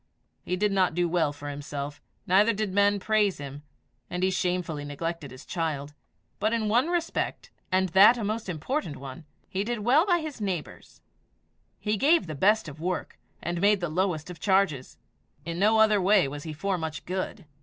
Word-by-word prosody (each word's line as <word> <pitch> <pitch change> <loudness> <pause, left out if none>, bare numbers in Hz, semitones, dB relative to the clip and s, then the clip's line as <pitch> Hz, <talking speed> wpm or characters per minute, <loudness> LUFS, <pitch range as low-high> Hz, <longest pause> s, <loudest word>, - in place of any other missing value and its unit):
He 180 - -2
did 205 +2 +1
not 185 -4 +2
do 175 0 +2
well 165 -3 +1
for 145 0 -9
himself, 145 0 -6 0.2
neither 205 +5 +4
did 210 -2 -2
men 200 0 +3
praise 210 -1 +2
him; 140 0 -8 0.5
and 180 +1 -3
he 190 - +3
shamefully 180 -5 -1
neglected 155 +1 -4
his 130 +2 -12
child; 150 -4 -3 0.5
but 215 +2 +1
in 220 -2 0
one 240 +7 +3
respect, 345 -1 -2 0.2
and 185 0 +2
that 200 +7 +7
a 230 - -3
most 215 0 -3
important 170 - -3
one, 140 +4 -9 0.2
he 190 +1 -2
did 235 0 -3
well 275 - +4
by 350 -2 +4
his 305 -7 -6
neighbours: 185 -6 -5 0.8
he 210 0 -1
gave 310 - +4
the 155 - -5
best 205 +8 +3
of 155 +1 -9
work, 180 +1 -3 0.2
and 175 0 -2
made 205 0 +4
the 175 -2 -2
lowest 175 -1 -1
of 175 - -11
charges. 190 -9 +1 0.5
In 170 +1 -4
no 215 +3 +4
other 215 -2 +5
way 195 -4 +4
was 145 +2 -7
he 160 - -4
for 185 +4 -2
much 160 -2 -5
good. 185 -2 -4
185 Hz, 185 wpm, -27 LUFS, 155-210 Hz, 0.8 s, that